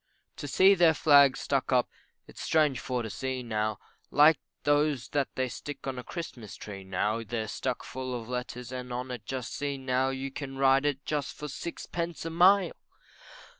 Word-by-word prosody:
To 145 - -5
see 190 +7 +6
their 170 -4 +5
Flags 140 -3 +6
stuck 135 -1 0
up, 125 -2 +3 0.4
it's - - -11
strange 150 -5 +2
for 125 -2 -2
to 110 - -4
see 130 +1 -3
now, 110 -2 -1 0.3
Like 150 0 +6 0.2
those 145 -2 +2
that 140 -2 +1
they 130 0 0
stick 140 +3 -7
on 130 -2 -3
a - - -7
Christmas 125 - -7
tree, 100 -2 -8
now, 105 +4 -1
They're 110 0 -3
stuck 125 +3 -3
full 130 -1 -4
of 115 - -10
letters 125 0 -5
and 125 -1 -6
on 125 +1 -4
it 120 -4 -7
just 130 -2 -4
see 145 -1 -2
now, 130 0 0
You 135 +1 -4
can 135 -1 -6
ride 135 +1 +3
just 145 -2 -2
for 150 - -5
sixpence 170 +3 -5
a 165 - -3
mile! 180 +2 +5
130 Hz, 180 wpm, -29 LUFS, 125-145 Hz, 0.4 s, see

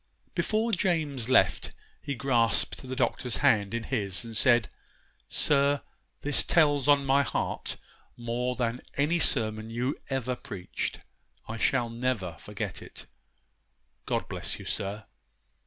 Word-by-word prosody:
Before 220 +2 +1
James 160 - 0
left, 130 - +3 0.3
he 140 - -3
grasped 120 -2 +2
the 130 0 -6
Doctor's 125 -1 0
hand 100 -2 +4
in 115 - -2
his 100 -6 -2
and 115 -1 -7
said, 120 -1 +4 0.6
'Sir, 140 -1 +3 0.4
this 145 -1 +3
tells 145 -5 +3
on 140 -1 +5
my 135 +1 +4
heart - - -2 0.4
more 120 +1 -2
than 120 -1 -1 0.2
any 155 +5 +2
sermon 110 -6 +1
you 125 +5 -1
ever 130 -2 -1
preached, 90 -6 -5 0.5
I 115 - -5
shall 120 +1 +1
never 115 -7 -1
forget - - -5
it. - - -10 1.0
God - - -1
bless - - -3
you, - - -10
sir! 100 +2 -3
125 Hz, 130 wpm, -28 LUFS, 115-140 Hz, 1.0 s, on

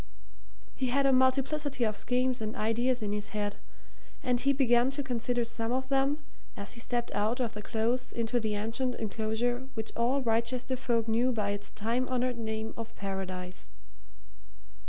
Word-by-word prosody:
He 260 - -1
had 275 +3 +2
a 270 - +5
multiplicity 270 +1 +2
of 215 -2 +1
schemes 250 +1 +1
and 215 0 -3
ideas 235 +3 +1
in 205 - -1
his 210 0 -1
head, 205 -1 -1 0.7
and 245 -1 +2
he 275 +3 +3
began 250 -2 +4
to 280 +1 -1
consider 245 -1 0
some 230 0 -1
of 260 +1 -1
them 275 +2 +2 0.3
as 200 - -5
he 235 - -8
stepped 240 0 -1
out 220 +5 +1
of 235 -3 0
the 210 - -5
Close 235 +4 0
into 235 +1 0
the 215 -2 -1
ancient 230 +4 -1
enclosure 225 +4 -1
which 220 -1 -3
all 255 +4 +2
Wrychester 235 +3 +1
folk 235 -3 0
knew 235 +3 +3
by 210 -4 0
its 205 0 -3
time 235 +4 -1
honoured 250 -1 0
name 220 0 -3
of 225 0 -6
Paradise. 185 -2 -4
235 Hz, 170 wpm, -31 LUFS, 220-255 Hz, 0.7 s, a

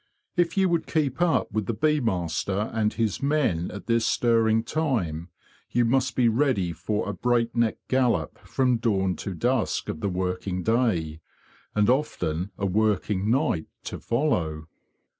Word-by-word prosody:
If 175 0 +1
you 190 -1 +4
would 170 -2 0
keep 150 -2 -1
up 175 -8 +2
with 110 -1 -2
the 115 - -1
bee 150 +4 +2
master 95 - -1
and 110 -1 +1
his 110 -4 -1
men 140 - +1
at 100 - -8
this 115 -1 +2
stirring 115 -2 +2
time, 110 - -1 0.4
you 120 -1 +2
must 130 0 +1
be 125 -2 +3
ready 115 -8 +1
for 105 +6 -2
a 100 - -2
break 120 0 0
neck 115 -2 +1
gallop 120 - +1
from 125 -2 +1
dawn 95 -5 +1
to 100 - -5
dusk 120 +5 0
of - - -4
the 100 - -1
working 90 0 -2
day, 90 -10 0 0.5
and 105 -1 +3
often 100 - 0
a 100 - -2
working 105 0 +1
night 120 - +1 0.2
to - - -6
follow. 90 - -1
110 Hz, 160 wpm, -26 LUFS, 95-130 Hz, 0.5 s, you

